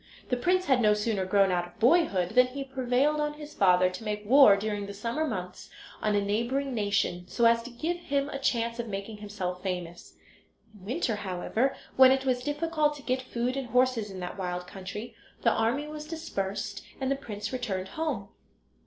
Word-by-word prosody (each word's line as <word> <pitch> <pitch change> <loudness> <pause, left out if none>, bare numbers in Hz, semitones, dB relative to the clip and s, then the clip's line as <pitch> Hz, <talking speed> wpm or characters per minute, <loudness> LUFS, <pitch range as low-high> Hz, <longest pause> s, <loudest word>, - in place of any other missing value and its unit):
The 250 - +2
prince 365 +9 +1
had 260 -3 +3
no 210 -2 +5
sooner 210 -2 -1
grown 195 0 +4
out 175 -1 0
of 175 - -20
boyhood 230 - +3
than 250 +3 +5
he 275 +2 -5
prevailed 265 +3 +1
on 295 0 -1
his 300 0 -10
father 185 -1 +4
to 205 - -8
make 210 -1 -3
war 240 -3 +7
during 205 -1 -3
the 200 - -7
summer 235 +9 -2
months 185 -7 -5 0.3
on 210 -1 +1
a 205 - +3
neighbouring 235 +7 -1
nation, 200 -5 0
so 235 - +1
as 230 0 +5
to 240 - -9
give 315 +9 -2
him 280 -4 -1
a 275 - -4
chance 235 -3 0
of 235 - -3
making 200 +1 -5
himself 195 -4 -5
famous. 175 - -5 0.6
In 195 -3 -15
winter, 240 - -1
however, 205 +7 -1 0.2
when 260 0 +9
it 265 0 +1
was 250 -1 +1
difficult 300 +1 0
to 285 - -11
get 255 0 0
food 250 0 -2
and 270 -2 -3
horses 250 -2 +2
in 190 -1 -7
that 180 +2 -6
wild 180 -1 -3
country, 195 +5 -7 0.3
the 230 - +5
army 235 +7 +1
was 300 0 -7
dispersed, 205 - -4 0.2
and 265 0 -1
the - - +3
prince 215 -4 -6
returned 195 -7 -3
home. 280 -12 -3
230 Hz, 195 wpm, -28 LUFS, 200-270 Hz, 0.6 s, when